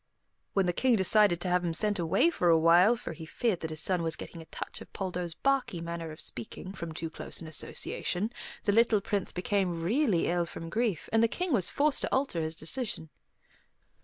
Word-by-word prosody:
When 195 -1 +2
the 175 - +1
King 250 +5 +3
decided 200 -2 +4
to 185 - -2
have 180 0 +2
him 170 -2 -1
sent 210 +1 +2
away 170 - +3
for 180 - +1
a 165 - +6
while, 175 +7 +6
for 230 -7 -6
he 160 0 -9
feared 220 0 0
that 160 - -4
his 155 0 -2
son 180 0 +2
was 165 -1 -1
getting 165 - -9
a - - -11
touch - - -7
of - - -12
Poldo's 180 -3 -3
barky 270 -10 0
manner 170 -1 -5
of 155 - -11
speaking, 125 - -5
from 170 -4 -6
too 160 +1 -4
close - - -4
an 165 - -8
association, 180 +5 -2 0.3
the 205 - +2
little 225 0 +4
Prince 200 -1 -2
became 180 -2 -1
really 215 - +2
ill 175 0 +1
from 165 +1 -8
grief, 220 -6 -1
and 225 - +5
the 230 - +5
King 360 +6 -2
was 195 -8 +2
forced 295 0 +2
to - - -1
alter 265 -11 0
his 160 0 -3
decision. 160 - -3
180 Hz, 215 wpm, -30 LUFS, 165-220 Hz, 0.3 s, a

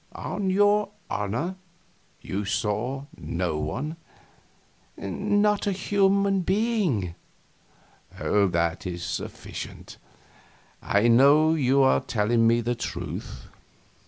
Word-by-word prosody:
On 195 -2 -3
your 205 +2 +3 0.2
honor 120 - -2 0.6
you 100 +2 -3
saw 115 +7 -2
no 85 -3 -2
one?" 135 - -4 1.0
"Not 205 - 0
a - - +2
human 195 0 +2
being." 190 - 0 1.1
"That 90 -2 +1
is 85 -1 -5
sufficient; - - -7 0.8
I 100 +3 +2
know 140 +6 +6
you 135 -3 +3
are 130 - +4
telling 115 +1 +1
me 115 +1 +3
the 120 +1 -1
truth." 120 - -6
130 Hz, 95 wpm, -26 LUFS, -, 1.1 s, know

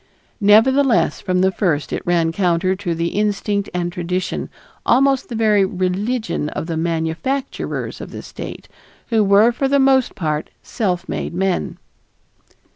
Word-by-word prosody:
nevertheless 235 +6 +4
from 185 -2 0
the 190 0 +3
first 170 -7 -1
it - - -2
ran 170 -2 +2
counter 185 +1 +1
to 185 -3 -3
the 170 +1 -1
instinct 205 0 -1
and 175 -1 -2
tradition, 180 +1 -3 0.3
almost 270 +1 +3
to - - -29
the 240 - -5
very 215 -3 +3
religion 190 0 -1
of - - -4
the 165 -1 -3
manufacturers 165 +12 -2
of - - -7
the - - -8
state, - - -8 0.4
who 225 -3 +3
were 205 +4 +5
for 270 +3 -1
the 280 +1 +3
most 265 -2 +3
part 155 -6 -2
self 185 -5 -2
made - - -4
men. 190 0 -1
195 Hz, 150 wpm, -19 LUFS, 175-225 Hz, 0.4 s, were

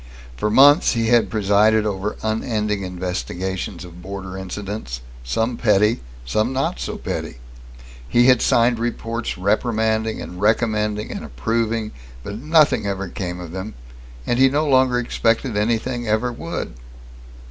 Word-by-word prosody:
For 105 - -1
months 145 +8 +6
he 115 -1 0
had 120 -1 +4
presided 105 +1 +3
over 105 0 -2
unending 110 -2 -1
investigations 90 +1 -4
of 90 0 -12
border 95 0 -7
incidents, 95 - -5 0.2
some 115 - -1
petty, 105 0 +3 0.2
some 110 - 0
not 135 +1 -1
so - - -4
petty. - - -5 0.7
He 120 0 +4
had 125 -2 +5
signed 120 0 +3
reports 115 0 -3
reprimanding 110 +2 0
and 90 +1 -8
recommending 105 -1 +1
and - - -5
approving, 110 - -1 0.3
but 105 +7 -6
nothing 150 -6 +3
ever 100 -1 -3
came 90 -1 -5
of 85 -2 -8
them, 95 +4 -6 0.5
and 120 - 0
he 135 0 +6
no 150 +3 0
longer 130 -2 +4
expected 115 0 0
anything 120 +3 -1
ever 110 +3 +1
would. - - -5
110 Hz, 135 wpm, -21 LUFS, 95-115 Hz, 0.7 s, months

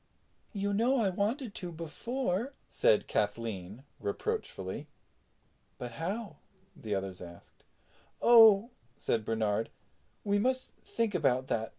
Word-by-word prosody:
"You 200 -1 -1
know 240 +6 +3
I 215 -5 +2
wanted 215 +5 -1
to 180 -2 -5
before," 205 - -3 0.2
said 105 - +3
Kathleen 105 0 -2 0.2
reproachfully. 95 -1 -3 0.9
"But 120 -1 -6
how?" 180 - -4 0.4
the 105 -2 -3
others 95 -1 -4
asked. 85 -1 -13 0.6
"Oh," 225 -1 +7 0.3
said 110 - 0
Bernard, 110 -1 0 0.5
"we 205 0 +2
must 255 +4 0
think 230 -3 -1
about 130 -6 +1
that. 110 0 -1
170 Hz, 110 wpm, -31 LUFS, -, 0.9 s, Oh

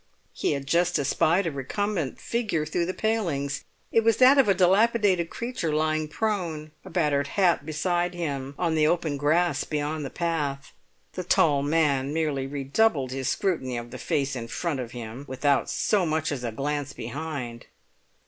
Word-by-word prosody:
He - - 0
had 140 -1 -4
just 170 +5 +2
espied 165 +6 +2
a 165 - 0
recumbent 160 +3 -2
figure 210 -10 -1
through 170 +2 -1
the 185 - -2
palings; 155 -11 -1 0.3
it 225 - +3
was 225 -1 +3
that 260 +2 +7
of 260 - +5
a 195 - +4
dilapidated 190 -1 +3
creature 235 -9 -3
lying 155 0 +1
prone, 165 -5 -2
a - - -10
battered 145 -5 +1
hat 175 -5 +2
beside 175 +3 0
him, 140 -5 -4
on 170 -3 0
the 155 -1 +3
open 160 -3 0
grass 160 +5 +2
beyond 150 0 -2
the 135 - -4
path. 150 -5 -2 0.4
The 185 - -4
tall 150 -5 +3
man 145 -2 +1
merely 145 -4 0
redoubled 140 - +1
his 130 -1 -2
scrutiny 135 -11 -1
of 120 0 -7
the 130 - -7
face 140 -1 -1
in 115 -2 -5
front 150 +4 -2
of, 125 -2 -4
him, 120 +2 -7
without 135 +2 +1
so 205 -3 +1
much 155 0 0
as 135 -4 -3
a 120 - -2
glance 145 +3 -3
behind. 125 -2 -6
155 Hz, 170 wpm, -26 LUFS, 140-175 Hz, 0.4 s, that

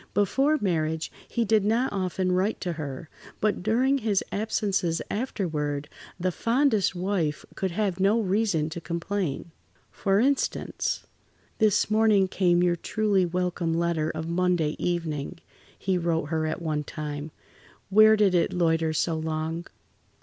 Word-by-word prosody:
Before 270 +10 +2
marriage 160 -5 -1 0.2
he 235 - -1
did 220 -1 +3
not 230 +5 +1
often 185 -1 -1
write 185 +4 +1
to 175 -2 -2
her, 150 -1 -6 0.3
but 210 -3 0
during 255 +7 +2
his 210 -5 +1
absences 200 -5 0
afterward, 155 - -2 0.3
the 185 +1 0
fondest 230 - +1
wife 175 -5 -1
could 190 - -2
have 190 0 -1
no 200 +4 +3
reason 195 -6 +1
to 170 - -6
complain. 170 -1 -3 0.4
For 195 0 +1
instance: 275 +4 0 0.5
"This 215 -1 +3
morning 215 -3 +4
came 180 -2 +2
your 175 -1 +2
truly 200 0 +1
welcome 175 -1 -1
letter 165 -2 0
of 160 0 -4
Monday 170 -3 +1
evening," 165 -2 -2 0.4
he 190 -2 0
wrote 165 -3 -1
her 160 -1 0
at 160 +2 -4
one 155 -2 -1
time. 150 0 -5 0.6
"Where 215 +2 +7
did 205 -3 +3
it 175 -2 +2
loiter 165 -2 +1
so 165 +2 0
long? 160 +2 -3
180 Hz, 140 wpm, -26 LUFS, 160-205 Hz, 0.6 s, Where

